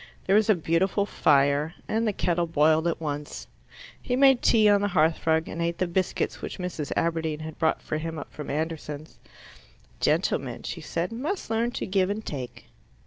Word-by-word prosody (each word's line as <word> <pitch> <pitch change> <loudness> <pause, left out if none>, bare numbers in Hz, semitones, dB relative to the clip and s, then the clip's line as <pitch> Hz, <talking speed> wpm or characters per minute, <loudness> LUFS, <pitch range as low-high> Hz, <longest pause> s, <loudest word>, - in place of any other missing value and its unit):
There 195 - +3
was 215 +1 +3
a 215 - +6
beautiful 180 +5 +1
fire, 145 -2 +2
and 225 +1 0
the - - +2
kettle 175 -3 0
boiled 160 +1 +3
at 170 - -1
once. 150 -2 -5 0.6
He 250 - -1
made 270 -1 +5
tea 215 -2 +5
on 205 -1 +5
the 205 - +1
hearth 165 -4 +1
rug 160 0 +2
and 170 - -5
ate 170 0 -1
the 185 - +1
biscuits 180 +1 -1
which - - -6
Mrs. 175 -5 -4
Aberdeen 160 -2 -1
had 155 0 -8
brought 160 - +1
for 155 - -3
him 165 0 -5
up 145 - -8
from 150 - -7
Anderson's. 155 0 -4 0.8
"Gentlemen," - - 0
she - - -5
said, 170 +4 -3
"must 285 - -4
learn 230 +2 +1
to - - -3
give 190 -1 +1
and 215 +2 -3
take." 130 -4 -6
170 Hz, 190 wpm, -26 LUFS, 155-205 Hz, 0.8 s, a